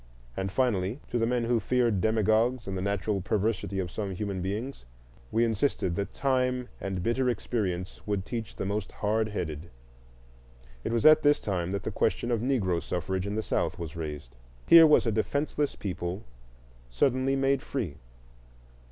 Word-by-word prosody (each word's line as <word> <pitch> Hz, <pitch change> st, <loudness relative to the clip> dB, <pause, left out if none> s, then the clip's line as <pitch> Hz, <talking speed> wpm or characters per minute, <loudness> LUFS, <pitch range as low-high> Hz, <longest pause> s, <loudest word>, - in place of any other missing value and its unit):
And, 95 Hz, 0 st, -2 dB
finally, 110 Hz, -1 st, 0 dB
to 120 Hz, -, +1 dB
the 115 Hz, -, +2 dB
men 120 Hz, 0 st, +1 dB
who 115 Hz, 0 st, +2 dB
feared 120 Hz, -5 st, +1 dB
demagogues 110 Hz, +3 st, +2 dB
and 95 Hz, -, -3 dB
the 95 Hz, -, -2 dB
natural 100 Hz, +1 st, -1 dB
perversity 100 Hz, 0 st, -1 dB
of 90 Hz, -3 st, -2 dB
some 100 Hz, -2 st, -4 dB
human 100 Hz, -1 st, -3 dB
beings 105 Hz, -, -4 dB, 0.5 s
we 115 Hz, +1 st, +3 dB
insisted 110 Hz, -5 st, 0 dB
that 100 Hz, +1 st, -3 dB
time 125 Hz, -2 st, 0 dB
and 95 Hz, -2 st, -3 dB
bitter 125 Hz, +4 st, +1 dB
experience 95 Hz, -6 st, -2 dB
would 100 Hz, -2 st, -1 dB
teach 115 Hz, -2 st, -5 dB
the -, -, -4 dB
most 100 Hz, +1 st, -3 dB
hardheaded. 105 Hz, -7 st, -2 dB, 1.1 s
It -, -, -2 dB
was 115 Hz, +4 st, 0 dB
at 155 Hz, 0 st, +8 dB
this 145 Hz, 0 st, +4 dB
time 90 Hz, -4 st, -2 dB
that 100 Hz, 0 st, -3 dB
the -, -, -3 dB
question 120 Hz, -, 0 dB
of 115 Hz, -2 st, +1 dB
Negro 105 Hz, -10 st, +1 dB
suffrage 95 Hz, +2 st, -2 dB
in 100 Hz, -, -3 dB
the 110 Hz, -, -1 dB
South -, -, -1 dB
was 85 Hz, -2 st, -6 dB
raised. 75 Hz, -7 st, -6 dB, 0.3 s
Here 165 Hz, -1 st, +9 dB
was 150 Hz, -, +5 dB
a 115 Hz, -, +2 dB
defenceless 140 Hz, +6 st, -1 dB
people 90 Hz, 0 st, -4 dB, 0.7 s
suddenly 130 Hz, -, +1 dB
made 135 Hz, 0 st, +2 dB
free. 115 Hz, -, -4 dB
105 Hz, 165 wpm, -28 LUFS, 95-125 Hz, 1.1 s, Here